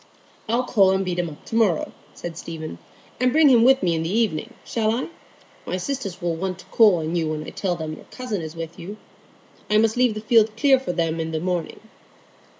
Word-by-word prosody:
"I'll 235 +3 +2
call 205 -6 +4
and 190 0 0
beat 180 -1 -2
him 175 -1 -1
up 145 - -13
to - - -6
morrow," 210 -8 +2 0.2
said 170 -1 -7
Stephen, 160 -1 -7 0.4
"and 250 0 +3
bring 310 +1 +6
him 240 -3 +6
with 265 +2 +5
me 175 -2 +2
in 160 - -1
the 165 - -2
evening, 205 -6 -1
shall 220 -2 0
I? 245 +7 -2 0.6
My 185 - -1
sisters 205 -3 -4
will 170 -1 0
want 185 +1 -3
to 185 - -14
call 215 -5 +6
on 160 0 -2
you 165 -2 0
when 155 -1 -3
I - - -8
tell 185 -3 -2
them 160 -2 -5
your - - -11
cousin 240 -7 -5
is 160 0 -7
with 165 0 -7
you. 200 +5 -8 0.7
I 210 - +4
must 220 +1 +2
leave 245 -3 +3
the 215 - -5
field 220 -1 +3
clear 270 +1 +5
for 260 - -3
them 165 -2 -1
in 160 0 -2
the 160 - -1
morning." 175 -1 -3
190 Hz, 230 wpm, -23 LUFS, 165-230 Hz, 0.7 s, bring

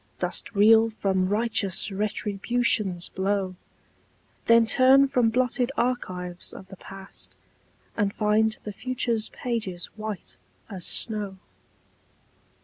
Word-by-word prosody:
Dost - - -2
reel 220 +2 +6
from 190 -4 -1
righteous 210 -2 0
Retribution's 210 -1 0
blow? 190 -1 -1 0.9
Then 230 0 +6
turn 265 +4 +5
from 250 -4 +2
blotted 250 +1 0
archives 180 -8 -2
of 190 - -11
the 190 - -10
past, 195 +1 -12 0.6
And 205 -2 0
find 215 +1 +1
the 210 - -6
future's 235 -1 -2
pages 215 -8 -4
white 215 -3 -6 0.3
as 185 -4 -3
snow. 210 -4 -1
215 Hz, 105 wpm, -25 LUFS, 195-230 Hz, 0.9 s, reel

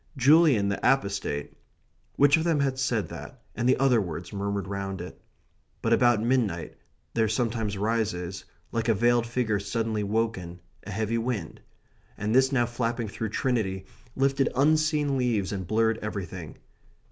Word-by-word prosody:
"... - - -20
Julian 145 -9 +6
the 100 - -1
Apostate...." 100 - 0 0.6
Which 145 0 +5
of 160 - 0
them 145 -5 +1
said 125 -5 0
that - - -9 0.2
and 120 - +1
the - - +4
other 130 -4 +3
words 85 0 -6
murmured 100 -1 -2
round 95 -1 -4
it? 90 +1 -9 0.6
But 115 - +3
about 120 -2 +4
midnight 115 -9 0 0.4
there 115 -1 +2
sometimes 110 -2 -1
rises, 100 -4 -2 0.3
like 115 0 -1
a 115 - +4
veiled 120 +2 +2
figure 115 -3 0
suddenly 110 +1 -2
woken, 100 -5 -2 0.3
a - - -6
heavy 110 +3 -1
wind; 115 -8 -4 0.6
and 105 +2 -1
this 130 +1 +4
now 120 -3 +2
flapping 120 -1 -2
through 110 +1 -4
Trinity 100 -6 -1 0.3
lifted 135 0 +2
unseen 150 0 +2
leaves 115 -7 0
and 95 -3 -4
blurred 110 +1 +2
everything. 95 -6 -6
115 Hz, 150 wpm, -27 LUFS, 100-125 Hz, 0.6 s, Julian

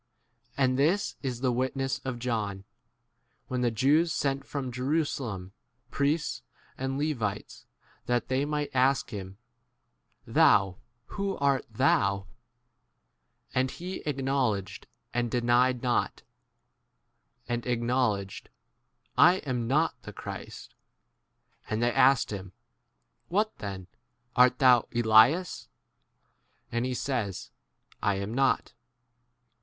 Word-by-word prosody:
And 130 -1 +2
this 175 +8 +1
is 125 -3 -4
the 130 -2 +2
witness 130 +2 -1
of 130 -2 -3
John, 110 -5 -3 0.9
when 125 -1 -1
the 120 - +2
Jews 145 +9 +3
sent 140 -2 -1
from 135 -3 -4
Jerusalem 125 - -2 0.4
priests 150 +3 0 0.3
and 135 +1 -3
Levites 120 -9 -3 0.4
that 120 0 0
they 130 +1 0
might 150 0 -2
ask 130 0 +2
him, 95 -2 -7 0.9
29 - - -13
Thou, 95 -1 +4 0.3
who 200 -1 -3
art 140 -2 +1
thou? 100 -5 +2 1.3
And 130 0 +1
he 180 +7 -6
acknowledged 135 -8 -1 0.3
and 120 -1 0
denied 125 +1 +2
not, 120 -1 0 1.2
and 120 -1 -2
acknowledged, 120 -5 -1 0.7
I* 175 +3 +8
am 125 -4 -2
not 140 -1 +1
the 105 - -9
Christ. - - -8 0.9
21 - - -4
And 115 - -1
they 120 0 +2
asked 135 -3 +4
him, 95 -2 -6 0.7
What 210 +4 0
then? 95 -3 -6 0.5
Art 125 0 +5
thou 125 -3 +5
* - - -20
Elias? 120 - +4 1.0
And 120 +2 -1
he 130 - -2
says, 120 -8 -3 0.5
I 100 - +1
am 100 +3 -4
not. 135 +1 +1
125 Hz, 115 wpm, -28 LUFS, 115-140 Hz, 1.3 s, I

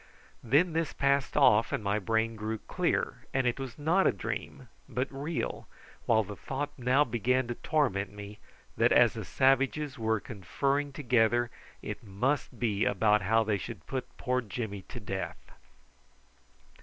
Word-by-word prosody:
Then 150 +9 +3
this 165 -2 -1
passed 140 -2 +1
off 105 +2 +5
and 140 -6 -2
my 100 +1 +1
brain 110 +3 0
grew 110 +1 -3
clear, - - -2
and 135 -1 +2
it 120 +2 0
was 135 -3 -6
not 165 +6 +3
a - - +5
dream, 100 - -5 0.2
but 130 +2 -1
real, 145 +4 -4 0.4
while 110 -1 +4
the 105 +1 -8
thought 135 +6 -4
now 130 +2 +3
began 125 +1 0
to - - 0
torment 120 - 0
me, 105 +1 -9 0.4
that - - +4
as - - +6
the - - -5
savages 135 +1 +1
were 110 -1 +1
conferring 140 - -2
together 120 -3 +2 0.3
it - - -6
must 125 +7 -1
be 110 -4 +1
about 105 -1 +3
how 115 +4 +3
they 105 -2 0
should 115 +3 -8
put 130 -2 -5
poor 125 0 0
Jimmy 105 -2 -5
to - - -7
death. - - -6
120 Hz, 155 wpm, -30 LUFS, 110-140 Hz, 0.4 s, as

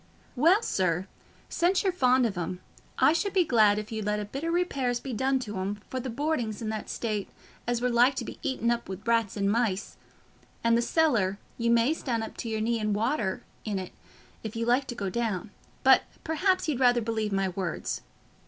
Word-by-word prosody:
"Well, 340 - +4
sir, 185 - 0 0.4
since 365 +4 +2
you're 385 - +2
fond 255 -6 +4
of 215 -4 -1
'em, 175 +1 -3 0.4
I 305 - +5
should 365 +4 -1
be 375 -2 +4
glad 215 -8 +4
if 215 +1 -5
you'd 220 -1 -3
let 210 0 +1
a 210 - -3
bit 270 +8 -6
o' - - -1
repairs 280 -8 0
be 260 0 -6
done 265 +4 +1
to 210 -5 -5
'em, 200 +2 -3
for 260 - -2
the 255 +1 -4
boarding's 245 -4 -1
i' 230 - -5
that 215 -1 -4
state 215 -4 -2 0.4
as 240 0 0
we're 250 - +2
like 245 +3 +4
to - - -3
be - - -8
eaten 240 -3 0
up 235 -3 -2
wi' 190 - -4
rats 230 -3 +1
and 200 0 +1
mice; 220 -4 -1 0.7
and 230 0 +4
the 235 - +3
cellar, 235 - +2 0.2
you 235 0 +1
may 235 +5 +4
stan' 240 -8 -2
up 220 - -7
to 230 - -4
your 220 -1 -1
knees 230 0 0
i' 215 - -1
water 210 -1 0 0.2
in't, 195 -4 -3 0.5
if 220 0 -6
you 230 0 -1
like 250 +3 +2
to 245 - -5
go 200 -5 -3
down; 220 -3 -2 0.3
but - - +7 0.2
perhaps 370 +4 +1
you'd 290 -5 0
rather 245 -2 +4
believe 220 -2 -1
my 195 -1 +1
words. 185 -3 -3
230 Hz, 210 wpm, -28 LUFS, 210-260 Hz, 0.7 s, but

